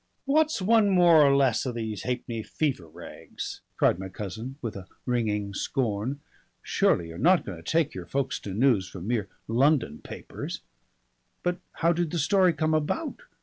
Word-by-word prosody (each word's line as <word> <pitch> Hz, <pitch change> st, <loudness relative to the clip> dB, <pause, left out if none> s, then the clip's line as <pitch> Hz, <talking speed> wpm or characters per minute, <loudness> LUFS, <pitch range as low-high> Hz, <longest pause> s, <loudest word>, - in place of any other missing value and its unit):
"What's 305 Hz, -5 st, +2 dB
one 220 Hz, 0 st, +4 dB
more 175 Hz, -4 st, +6 dB
or 140 Hz, -1 st, +5 dB
less 135 Hz, -4 st, +3 dB
of 125 Hz, -, -3 dB
these 110 Hz, -3 st, -4 dB
ha'penny 120 Hz, -2 st, -3 dB
fever 130 Hz, -, -2 dB
rags?" 85 Hz, +2 st, -8 dB, 0.2 s
cried 85 Hz, -, +3 dB
my 95 Hz, 0 st, -5 dB
cousin 105 Hz, +7 st, -6 dB
with 115 Hz, -6 st, -5 dB
a 95 Hz, -1 st, -8 dB, 0.2 s
ringing 105 Hz, -5 st, -1 dB
scorn. 120 Hz, +5 st, -2 dB, 0.4 s
"Surely 85 Hz, -1 st, +1 dB
you're 80 Hz, -, -8 dB
not 180 Hz, +2 st, +4 dB
going 85 Hz, -5 st, -7 dB
to -, -, -4 dB
take 160 Hz, -2 st, +2 dB
your 90 Hz, -2 st, -7 dB
Folkestone 125 Hz, -7 st, -2 dB
news 115 Hz, -7 st, +3 dB
from 90 Hz, -1 st, -8 dB
mere 110 Hz, -3 st, -1 dB, 0.2 s
London 130 Hz, -, +2 dB
papers." -, -, -7 dB, 0.8 s
"But 175 Hz, 0 st, 0 dB
how 170 Hz, +1 st, +2 dB
did 170 Hz, -1 st, -1 dB
the 170 Hz, -, -3 dB
story 185 Hz, +4 st, +4 dB
come 155 Hz, -1 st, 0 dB
about?" 160 Hz, -, -1 dB
130 Hz, 165 wpm, -27 LUFS, 100-165 Hz, 0.8 s, more